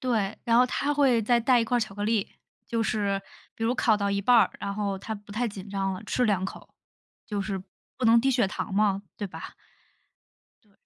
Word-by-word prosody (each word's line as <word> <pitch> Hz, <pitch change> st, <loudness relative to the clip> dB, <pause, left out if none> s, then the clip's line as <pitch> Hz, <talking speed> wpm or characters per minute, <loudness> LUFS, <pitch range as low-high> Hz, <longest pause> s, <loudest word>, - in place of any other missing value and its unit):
对， 220 Hz, -5 st, -1 dB
然 230 Hz, 0 st, +3 dB
后 250 Hz, -, +7 dB
她 285 Hz, +3 st, -1 dB
会 270 Hz, -5 st, +4 dB
再 235 Hz, +2 st, +3 dB
带 245 Hz, +1 st, +4 dB
一 -, -, +1 dB
块 245 Hz, +2 st, 0 dB
儿 -, -, +2 dB
巧 215 Hz, -3 st, -4 dB
克 205 Hz, -, -5 dB
力， 215 Hz, -1 st, +1 dB, 0.4 s
就 230 Hz, -1 st, -1 dB
是 200 Hz, -3 st, 0 dB, 0.3 s
比 225 Hz, -, -8 dB
如 235 Hz, +2 st, +2 dB
考 235 Hz, -3 st, +3 dB
到 200 Hz, -1 st, 0 dB
一 200 Hz, -, 0 dB
半 245 Hz, +5 st, +4 dB
儿， 225 Hz, -5 st, +5 dB
然 200 Hz, -, -4 dB
后 200 Hz, -2 st, -2 dB
她 220 Hz, +3 st, -5 dB
不 205 Hz, 0 st, -13 dB
太 230 Hz, +4 st, -1 dB
紧 200 Hz, -2 st, -7 dB
张 195 Hz, -1 st, -1 dB
了， 185 Hz, +2 st, -6 dB
吃 250 Hz, +4 st, 0 dB
两 200 Hz, -5 st, +1 dB
口。 190 Hz, -, -8 dB, 0.5 s
就 205 Hz, -2 st, -2 dB
是 195 Hz, -1 st, -3 dB, 0.4 s
不 255 Hz, -, -2 dB
能 230 Hz, +1 st, +7 dB
低 270 Hz, -, +1 dB
血 245 Hz, -6 st, +2 dB
糖 195 Hz, 0 st, -4 dB
吗？ 200 Hz, -1 st, +2 dB
对 205 Hz, -, -4 dB
吧？ 185 Hz, -, -9 dB, 1.1 s
对。 210 Hz, -, -31 dB
215 Hz, 245 characters per minute, -27 LUFS, 200-235 Hz, 1.1 s, 后